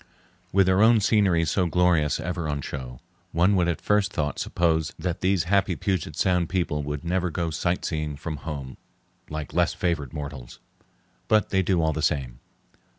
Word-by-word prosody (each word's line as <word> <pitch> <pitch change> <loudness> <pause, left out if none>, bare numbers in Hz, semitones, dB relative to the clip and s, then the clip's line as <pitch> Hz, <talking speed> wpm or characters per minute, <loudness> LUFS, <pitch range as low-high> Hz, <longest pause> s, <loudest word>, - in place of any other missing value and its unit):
With 95 0 +4
their 95 +2 +3
own 115 +1 +6
scenery 95 -6 +3
so 90 +3 +1
glorious 85 -3 +2
ever 85 -3 -3
on 70 -1 -2
show, 65 -3 -7 0.3
one 90 +5 +3
would 90 -2 +2
at 85 -3 -1
first 105 -1 +1
thought 75 -2 -2
suppose 80 -3 0
that 90 -2 -3
these 95 -2 +2
happy 95 0 +1
Puget 90 -6 -2
Sound 90 -2 +1
people 85 -5 -1
would 75 +1 -4
never 90 +1 0
go 85 0 -2
sightseeing 80 -2 -2
from 80 +1 -5
home 70 -4 -6 0.5
like 75 -1 -5
less - - +2
favored 75 -7 -1
mortals. 70 -4 -7 0.7
But 110 -1 +3
they 95 - +3
do 90 -2 +1
all 80 0 +1
the 80 - -3
same. 65 -6 -1
85 Hz, 170 wpm, -25 LUFS, 75-90 Hz, 0.7 s, own